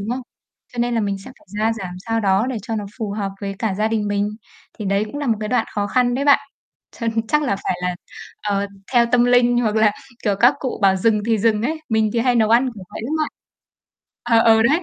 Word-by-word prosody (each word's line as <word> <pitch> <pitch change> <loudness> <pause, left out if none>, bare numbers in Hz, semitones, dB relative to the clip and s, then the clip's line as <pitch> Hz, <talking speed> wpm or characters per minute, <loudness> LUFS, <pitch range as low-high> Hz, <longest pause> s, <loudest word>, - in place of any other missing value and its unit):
đúng 205 +4 -4
không? 255 +1 -2 0.5
Cho 245 - -10
nên 240 0 +1
là 230 - +1
mình 200 -2 -1
sẽ 195 - -11
phải - - -25
gia 220 +1 +2
giảm 180 - -6
sao 225 0 0
đó 195 +3 +2
để 260 -3 -3
cho 225 -1 -3
nó 205 - -3
phù 215 -3 -3
hợp 200 -1 -3
với 195 -1 -4
cả 215 -4 -1
gia 215 +2 0
đình 215 -2 -1
mình, 205 0 0 0.5
thì 210 - -5
đấy 195 +2 +1
cũng 285 +7 -7
là 290 - -3
một 225 - +2
cái 215 - -3
đoạn 240 -2 +1
khó 205 -1 0
khăn 245 +3 +2
đấy 275 +3 -1
bạn. 285 -1 +6 0.6
Cho 230 - -2 0.2
chắc 300 0 +2
là 200 -8 0
phải 185 - -2
là, 180 0 0 0.5
ờ, 200 -1 0 0.3
theo 240 -1 +5
tâm 245 -1 +5
linh, 245 0 +4
hoặc 220 -2 0
là, 215 -1 +4 0.3
kiểu, 205 -2 +1
các 245 +4 +6
cụ 260 -3 -3
bảo 190 -1 +5
dừng 210 +2 +2
thì 225 -2 +2
dừng 220 0 +2
ấy, 315 +5 -2
mình 220 -1 +2
thì 235 - 0
hay 250 0 +2
nấu 220 -2 +3
ăn 250 +3 +4
kiểu 195 -3 -10
vậy - - -7
lắm 290 - -3
bạn. 310 - 0 0.9
Ờ, 230 -1 +3 0.2
ừ, 220 - +4
đấy, 300 +9 +3
225 Hz, 260 wpm, -21 LUFS, 205-245 Hz, 0.9 s, bạn